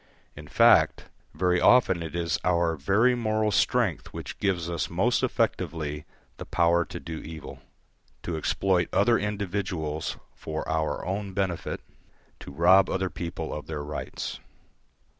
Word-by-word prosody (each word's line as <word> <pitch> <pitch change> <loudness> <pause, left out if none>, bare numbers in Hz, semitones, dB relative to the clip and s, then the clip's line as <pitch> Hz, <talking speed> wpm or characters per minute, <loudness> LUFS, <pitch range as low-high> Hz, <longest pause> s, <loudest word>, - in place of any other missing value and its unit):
In - - -10
fact, - - +4 0.3
very 90 +2 +2
often 105 -8 +5
it 85 0 -6
is 85 -1 -1
our 85 -2 +2
very 100 - +3
moral 110 -2 0
strength - - +1
which - - -8
gives 90 -4 0
us 85 -1 -2
most - - +1
effectively 75 -2 -1 0.3
the - - -7
power 85 0 +2
to - - -7
do 80 -1 -6
evil, 80 0 -9 0.6
to 85 - -3
exploit 90 +2 +1
other 120 -1 +3
individuals 95 -6 -3 0.2
for 80 0 -5
our 80 -1 -1
own 100 +1 -3
benefit, 95 -3 -2 0.6
to - - -10
rob 90 +6 +5
other 95 -1 -1
people 85 -2 -5
of 75 - -6
their 75 -2 -4
rights. 75 0 -5
85 Hz, 140 wpm, -27 LUFS, 80-95 Hz, 0.6 s, often